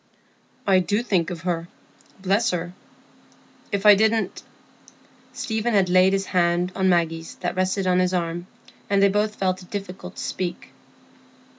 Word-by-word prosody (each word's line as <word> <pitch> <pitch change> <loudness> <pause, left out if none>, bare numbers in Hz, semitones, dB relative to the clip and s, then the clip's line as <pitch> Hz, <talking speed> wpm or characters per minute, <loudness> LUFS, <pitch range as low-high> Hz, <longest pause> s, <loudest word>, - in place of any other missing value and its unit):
"I 190 -2 +4
do 205 +5 0
think 185 -8 +1
of 175 -3 -6
her—bless 185 +5 -3
her. 175 0 -3 1.0
If 200 0 -2
I 210 - +10
didn't——" 220 -1 +1 0.9
Stephen 220 0 -2
had 190 -2 +3
laid 185 +1 +5
his 195 0 0
hand 175 0 +1
on 190 -1 +2
Maggie's 165 -2 0
that - - -2
rested 185 +1 0
on 180 0 +3
his 180 0 +2
arm, 175 -1 -2 0.4
and 200 -1 +3
they 200 0 +5
both 210 +2 0
felt 185 -1 -1
it 180 - -15
difficult 190 -2 -7
to - - -6
speak. 180 -2 -4
185 Hz, 150 wpm, -23 LUFS, 180-200 Hz, 1.0 s, I